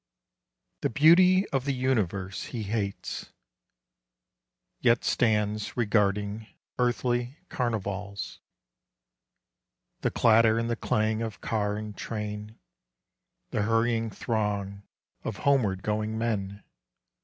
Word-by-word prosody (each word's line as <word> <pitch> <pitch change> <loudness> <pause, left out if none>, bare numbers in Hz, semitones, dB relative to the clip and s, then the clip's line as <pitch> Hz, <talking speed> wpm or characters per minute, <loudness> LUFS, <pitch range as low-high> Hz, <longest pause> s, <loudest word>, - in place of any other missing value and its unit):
The - - +1
beauty 180 - +6
of 135 -2 -1
the 140 -1 0
universe 100 -7 -1
he 115 -3 -5
hates, 100 -1 -3 1.5
Yet 120 -2 +3
stands 105 -2 +1
regarding 105 -1 +1 0.3
earthly 120 +2 0
carnivals: 100 -4 -3 0.8
— - - -55
The - - +1
clatter 115 0 +4
and 115 0 -1
the - - +1
clang 110 0 0
of 110 -3 -4
car 105 -2 -1
and 105 -1 -6
train 105 0 -5 0.9
The - - 0
hurrying 115 +1 +1
throng 100 -2 -2 0.4
of 110 - -4
homeward 110 -10 +2
going 110 +1 -1
men. 105 -3 -2
110 Hz, 100 wpm, -28 LUFS, 105-120 Hz, 1.5 s, beauty